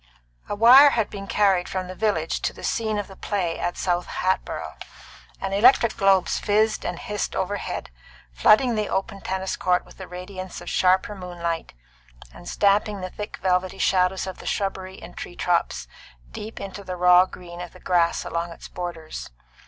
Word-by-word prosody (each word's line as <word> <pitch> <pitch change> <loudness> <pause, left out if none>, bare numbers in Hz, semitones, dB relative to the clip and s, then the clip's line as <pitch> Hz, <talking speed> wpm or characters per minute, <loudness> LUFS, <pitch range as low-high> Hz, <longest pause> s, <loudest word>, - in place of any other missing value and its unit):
XVI. - - -24
A - - -1
wire 250 +7 +9
had 225 -6 0
been 195 -1 -7
carried 195 -4 +2
from 185 -1 -3
the 185 - -7
village 185 -5 -1
to - - -1
the - - -12
scene 220 -2 -1
of 205 - -3
the 195 - -12
play 185 -4 -2
at 175 - -2
South 175 -1 0
Hatboro', 185 +1 -2 0.7
and 195 0 -3
electric 235 +2 +5
globes 195 -3 +3
fizzed 215 +1 +1
and 175 -1 -3
hissed 210 +3 -3
overhead, 190 - -3 0.4
flooding 225 - +5
the 215 -2 -1
open 195 +1 -2
tennis 190 0 -2
court 180 -1 +1
with - - -17
the 190 - -8
radiance 185 +1 -7
of - - -7
sharper 185 +2 +3
moonlight, 175 -3 -4 0.6
and 65 - -10
stamping 205 0 +2
the 185 0 -5
thick 210 0 -6
velvety 185 0 +1
shadows 185 0 +2
of 190 -1 -7
the - - -9
shrubbery 190 -1 -3
and - - -12
tree 175 - -7
tops 175 -1 0 0.4
deep 220 +2 -7
into 200 0 -7
the 185 -1 -5
raw 180 +1 +6
green 175 -1 -10
of 175 - -7
the 185 - -14
grass 175 -2 +1
along 170 +1 -2
its 165 - -10
borders. 170 -3 -6
190 Hz, 180 wpm, -24 LUFS, 180-205 Hz, 0.7 s, wire